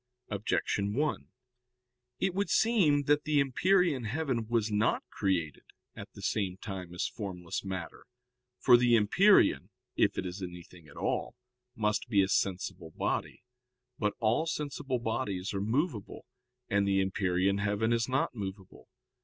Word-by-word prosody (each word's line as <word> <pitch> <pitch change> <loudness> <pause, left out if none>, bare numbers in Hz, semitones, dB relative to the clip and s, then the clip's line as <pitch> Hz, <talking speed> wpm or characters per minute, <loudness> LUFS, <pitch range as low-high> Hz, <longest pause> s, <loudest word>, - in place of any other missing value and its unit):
Objection 100 0 -1
1: 150 +3 -1 0.9
It 190 - 0
would 200 +2 -1
seem 180 -11 +3
that 145 +1 +2
the 150 -2 +2
empyrean 150 0 +2
heaven 125 -2 -2
was 115 -2 0
not 105 +1 +1
created 90 -7 -1 0.3
at - - -9
the - - -11
same 95 -3 -1
time 95 -3 -7
as 90 - -2
formless 90 -6 -5
matter. 95 -4 -6 0.5
For 125 -2 +6
the 120 -1 +4
empyrean, 190 - +4 0.3
if - - +2
it - - -2
is 90 +2 -6
anything 90 -2 -9
at 75 - -15
all, - - -2 0.4
must 105 +1 -1
be 100 -4 +4
a 95 - -1
sensible 95 -3 -1
body. - - -3 0.6
But 105 -2 0
all 115 +8 +1
sensible 145 -4 -2
bodies 110 -5 -2
are 100 - -2
movable, 120 - -2 0.4
and 100 0 +1
the 95 0 +2
empyrean 95 0 +1
heaven 105 +3 +1
is 115 +1 0
not 130 0 0
movable. 95 -3 -8
105 Hz, 145 wpm, -30 LUFS, 95-130 Hz, 0.9 s, For